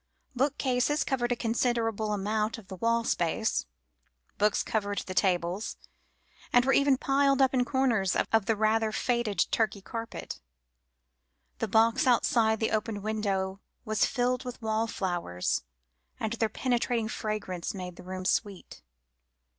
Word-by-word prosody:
Bookcases 270 Hz, +1 st, +1 dB
covered 245 Hz, -2 st, -1 dB
a -, -, +3 dB
considerable 225 Hz, -2 st, 0 dB
amount 210 Hz, +2 st, -1 dB
of 205 Hz, -5 st, -14 dB
the 190 Hz, -, -6 dB
wall 230 Hz, +3 st, +1 dB
space, 175 Hz, -, 0 dB, 0.7 s
books 210 Hz, 0 st, +3 dB
covered 205 Hz, -2 st, -2 dB
the 185 Hz, -, -5 dB
tables, 180 Hz, +1 st, 0 dB, 0.7 s
and 245 Hz, 0 st, +5 dB
were 270 Hz, -, +3 dB
even 280 Hz, -1 st, +4 dB
piled 275 Hz, +1 st, +2 dB
upon 265 Hz, -1 st, +3 dB
a -, -, +1 dB
corner 260 Hz, -6 st, +2 dB, 0.3 s
of 225 Hz, -3 st, +4 dB
the 225 Hz, -, +3 dB
rather 220 Hz, +1 st, +2 dB
faded 235 Hz, -3 st, +1 dB
Turkey 215 Hz, -2 st, +1 dB
carpet. 230 Hz, +3 st, -6 dB, 1.2 s
The -, -, -1 dB
box 225 Hz, +6 st, +3 dB
outside 225 Hz, -2 st, +3 dB
the 220 Hz, -, 0 dB
open 215 Hz, -1 st, -2 dB
window 195 Hz, -3 st, -1 dB, 0.3 s
was 215 Hz, -1 st, +2 dB
filled 250 Hz, +1 st, 0 dB
with 250 Hz, -1 st, -7 dB
wallflowers, 195 Hz, -, -1 dB, 0.6 s
and 220 Hz, 0 st, -2 dB
their 225 Hz, -1 st, 0 dB
penetrating 240 Hz, -1 st, 0 dB
fragrance 210 Hz, -6 st, -4 dB
made 180 Hz, -2 st, -6 dB
the -, -, -11 dB
room 185 Hz, 0 st, -6 dB
sweet. 200 Hz, -1 st, -2 dB
220 Hz, 135 wpm, -29 LUFS, 205-245 Hz, 1.2 s, and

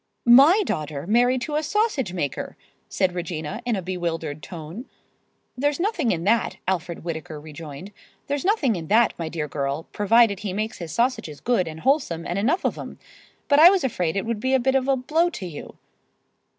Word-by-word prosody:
"My 280 Hz, -, +7 dB
daughter 150 Hz, -, -3 dB
married 245 Hz, +5 st, +3 dB
to 300 Hz, +5 st, -4 dB
a 305 Hz, -, +1 dB
sausage 315 Hz, -, 0 dB
maker!" 160 Hz, -7 st, -4 dB, 0.3 s
said 190 Hz, -2 st, 0 dB
Regina 170 Hz, +2 st, -4 dB
in 235 Hz, -, +1 dB
a 190 Hz, -, -4 dB
bewildered 165 Hz, -4 st, -3 dB
tone. 170 Hz, -, -8 dB, 0.7 s
"There's 290 Hz, +3 st, 0 dB
nothing 345 Hz, -, 0 dB
in 165 Hz, -1 st, -2 dB
that," 230 Hz, +5 st, +1 dB
Alfred 175 Hz, -3 st, -2 dB
Whittaker 160 Hz, -2 st, -5 dB
rejoined; 155 Hz, +3 st, -9 dB, 0.3 s
"there's 285 Hz, 0 st, -2 dB
nothing 355 Hz, -, +2 dB
in 165 Hz, -3 st, -6 dB
that, 225 Hz, +5 st, +4 dB
my 165 Hz, -2 st, -3 dB
dear 160 Hz, -2 st, -3 dB
girl, 140 Hz, +2 st, -3 dB
provided 210 Hz, -1 st, +4 dB
he 200 Hz, -3 st, -4 dB
makes 215 Hz, +3 st, -3 dB
his 170 Hz, -3 st, -6 dB
sausages 230 Hz, -, -1 dB
good 235 Hz, -8 st, +1 dB
and 160 Hz, 0 st, -8 dB
wholesome 265 Hz, -, +1 dB
and 175 Hz, +3 st, -2 dB
enough 280 Hz, -, +1 dB
of -, -, -1 dB
'em. -, -, -8 dB, 0.5 s
But 285 Hz, 0 st, +4 dB
I 330 Hz, +3 st, +10 dB
was 385 Hz, -1 st, +2 dB
afraid 180 Hz, -10 st, -1 dB
it 195 Hz, -, -1 dB
would 230 Hz, -2 st, -2 dB
be 260 Hz, +4 st, +1 dB
a -, -, +3 dB
bit 265 Hz, +2 st, +1 dB
of 265 Hz, -1 st, +1 dB
a 270 Hz, -, +3 dB
blow 320 Hz, +7 st, +1 dB
to 195 Hz, -, -7 dB
you." 165 Hz, -5 st, -9 dB
205 Hz, 190 wpm, -24 LUFS, 165-265 Hz, 0.7 s, I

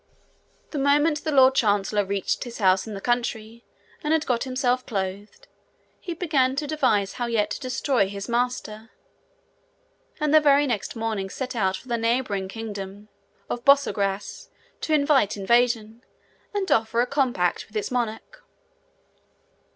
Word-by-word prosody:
The 295 Hz, -, -3 dB
moment 295 Hz, +2 st, +2 dB
the 310 Hz, -, -1 dB
lord 265 Hz, -2 st, +6 dB
chancellor 205 Hz, -4 st, +1 dB
reached 195 Hz, 0 st, -2 dB
his 240 Hz, -2 st, -8 dB
house 190 Hz, -1 st, +2 dB
in 215 Hz, -, -6 dB
the 195 Hz, -, -7 dB
country 235 Hz, -1 st, -2 dB, 0.4 s
and 300 Hz, +1 st, +1 dB
had 320 Hz, -1 st, +1 dB
got 245 Hz, 0 st, 0 dB
himself 255 Hz, -1 st, 0 dB
clothed, 205 Hz, -, -5 dB, 0.5 s
he 345 Hz, -, -6 dB
began 280 Hz, -7 st, +1 dB
to 295 Hz, +2 st, -2 dB
devise 255 Hz, -10 st, +1 dB
how 240 Hz, -, 0 dB
yet 215 Hz, -3 st, 0 dB
to -, -, -3 dB
destroy 255 Hz, -4 st, 0 dB
his 200 Hz, 0 st, -6 dB
master; 235 Hz, -2 st, -2 dB, 1.3 s
and 300 Hz, 0 st, +1 dB
the 310 Hz, -, +8 dB
very 290 Hz, -1 st, +4 dB
next 240 Hz, -5 st, -3 dB
morning 220 Hz, -4 st, -3 dB
set 255 Hz, +4 st, -5 dB
out 190 Hz, -4 st, +1 dB
for 250 Hz, -, -16 dB
the 235 Hz, -1 st, -1 dB
neighbouring 230 Hz, -4 st, 0 dB
kingdom 205 Hz, -1 st, -7 dB, 0.4 s
of 240 Hz, -, -4 dB
Borsagrass 210 Hz, -8 st, +1 dB, 0.3 s
to 315 Hz, -, -2 dB
invite 285 Hz, -8 st, +2 dB
invasion, 235 Hz, +2 st, +1 dB, 0.5 s
and 400 Hz, -2 st, -2 dB
offer 225 Hz, +1 st, +2 dB
a -, -, +2 dB
compact 250 Hz, -10 st, 0 dB
with 215 Hz, -, -6 dB
its 210 Hz, -, -3 dB
monarch. 245 Hz, -, -4 dB
235 Hz, 150 wpm, -24 LUFS, 205-270 Hz, 1.3 s, the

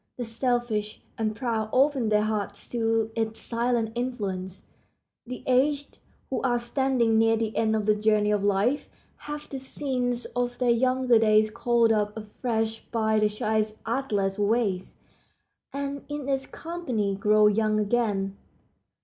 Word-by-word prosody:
The 245 Hz, -, -3 dB
selfish 225 Hz, -3 st, -1 dB, 0.2 s
and 215 Hz, -1 st, -1 dB
proud 225 Hz, -3 st, -2 dB
open 265 Hz, -3 st, +3 dB
their 210 Hz, 0 st, +3 dB
hearts 205 Hz, -2 st, -3 dB
to 225 Hz, -2 st, 0 dB
its 225 Hz, -1 st, -1 dB
silent 235 Hz, -1 st, 0 dB
influence. 200 Hz, -7 st, -4 dB, 0.6 s
The 250 Hz, +1 st, -7 dB
aged, 280 Hz, +3 st, +1 dB, 0.3 s
who 265 Hz, -, -1 dB
are 245 Hz, -2 st, +2 dB
standing 240 Hz, -2 st, +1 dB
near 225 Hz, 0 st, +4 dB
the 220 Hz, -1 st, -2 dB
end 220 Hz, -1 st, +2 dB
of 215 Hz, -1 st, -1 dB
the 215 Hz, -, +4 dB
journey 210 Hz, 0 st, +2 dB
of 205 Hz, -1 st, +1 dB
life, 205 Hz, +8 st, +1 dB, 0.4 s
have 295 Hz, 0 st, -5 dB
the 270 Hz, -, -6 dB
scenes 250 Hz, -2 st, -2 dB
of 245 Hz, 0 st, -1 dB
their 250 Hz, -2 st, +2 dB
younger 255 Hz, 0 st, +3 dB
days 215 Hz, -1 st, +4 dB
called 235 Hz, 0 st, +2 dB
up 210 Hz, 0 st, 0 dB
afresh 220 Hz, +1 st, -3 dB
by 220 Hz, -2 st, +1 dB
the 210 Hz, 0 st, +3 dB
child's 215 Hz, +1 st, -1 dB
artless 210 Hz, -6 st, -1 dB
ways, 205 Hz, -3 st, 0 dB, 0.8 s
and 280 Hz, 0 st, -4 dB
in 290 Hz, -2 st, -4 dB
its 270 Hz, -1 st, -1 dB
company 255 Hz, -, -3 dB
grow 210 Hz, +2 st, +4 dB
young 215 Hz, 0 st, +3 dB
again. 205 Hz, -3 st, 0 dB
225 Hz, 145 wpm, -26 LUFS, 215-250 Hz, 0.8 s, near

